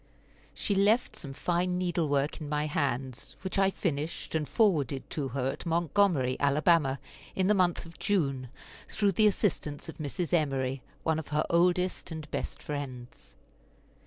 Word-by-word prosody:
She 205 - 0
left 215 +4 +3
some 140 -10 -7
fine 180 +4 0
needle 175 -3 0
work 145 +2 0
in 150 - -5
my 150 0 0
hands, 135 -4 -2
which 190 +1 -1
I 195 0 +5
finished, 160 -5 -3
and 155 -2 -1
forwarded 150 - +2
to 145 -3 -2
her 130 0 -1
at - - -8
Montgomery, 170 -5 +2
Alabama, 145 -1 +3 0.4
in 190 - +2
the 210 - +5
month 180 -4 +2
of 165 0 -13
June, 140 - 0 0.4
through 205 -2 +2
the 215 +4 +5
assistance 165 -8 -1
of 165 - -9
Mrs. 160 +3 -3
Emory, 135 -5 +1 0.2
one 160 -1 +1
of 160 - -7
her 150 +1 0
oldest 180 +2 +2
and 160 -2 -6
best - - -4
friends. 130 -4 -7
160 Hz, 160 wpm, -29 LUFS, 140-180 Hz, 0.4 s, I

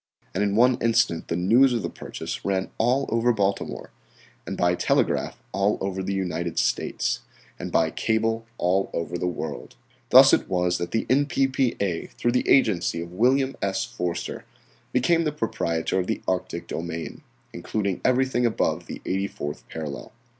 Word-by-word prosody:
And - - 0
in 100 0 0
one 125 +2 +4
instant 115 -7 +2
the - - -1
news 115 +9 +4
of 115 -4 -1
the - - -1
purchase - - -6
ran 95 -1 -1
all 125 +4 +2
over 115 +2 +2
Baltimore, 100 -3 -2 0.6
and - - -4
by 90 0 +3
telegraph - - +1
all 100 +2 +1
over 95 0 -2
the 95 +1 -3
United 85 -3 -2
States, - - 0 0.4
and - - -5
by - - +2
cable 115 +1 0
all 95 +2 +1
over 85 +1 -3
the 90 - -1
Old 90 - -2
World. - - -6 0.3
Thus - - +8
it - - +2
was 90 -1 +1
that 85 - -3
the 115 - -1
N.P.P.A. 130 - +1
through 120 - +1
the 125 - 0
agency 105 -10 +3
of 85 +1 -6
William 130 +6 +2
S. 95 -1 0
Forster, 90 -8 -4 0.5
became 165 +7 +3
the 150 - 0
proprietor 95 - -1
of 90 - -2
the 110 - -2
Arctic 90 -2 -2
domain, 85 0 -5 0.3
including 100 -4 -2
everything 130 -1 +2
above 115 -2 0
the - - -8
eighty 95 +1 0
fourth 75 -5 -7
parallel. 75 -3 -6
100 Hz, 165 wpm, -25 LUFS, 90-120 Hz, 0.6 s, Thus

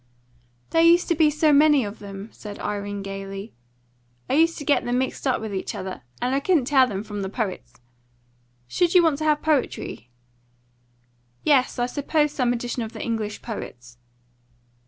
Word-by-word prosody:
"There 330 - +4
used 340 +1 +5
to 340 - +3
be 310 -1 +4
so 300 0 +3
many 295 -2 +5
of 205 +1 -7
them," 200 +1 -8
said 205 -1 -9
Irene 205 -1 -4
gaily. 195 +1 -7 0.7
"I - - -1
used 330 +3 +3
to 290 - -7
get 290 - +3
them 245 +1 0
mixed 260 +2 -2
up 260 - +2
with 220 -2 -5
each 190 - -3
other, 185 -7 -6 0.2
and 250 +1 0
I 275 - +2
couldn't 305 -3 +2
tell 265 -1 +5
them 200 -3 -4
from 210 -2 -6
the 190 - -3
poets. 185 - -4 0.9
Should 345 - 0
you 355 - +8
want 310 -3 +2
to 310 - -2
have 300 -1 +2
poetry?" 280 - -1 1.3
"Yes; 270 -4 +3
I 245 - +1
suppose 295 +3 0
some 255 -4 +1
edition 245 0 -3
of 225 0 -5
the - - -6
English 220 -3 -3
poets." 120 - -8
245 Hz, 175 wpm, -24 LUFS, 205-295 Hz, 1.3 s, you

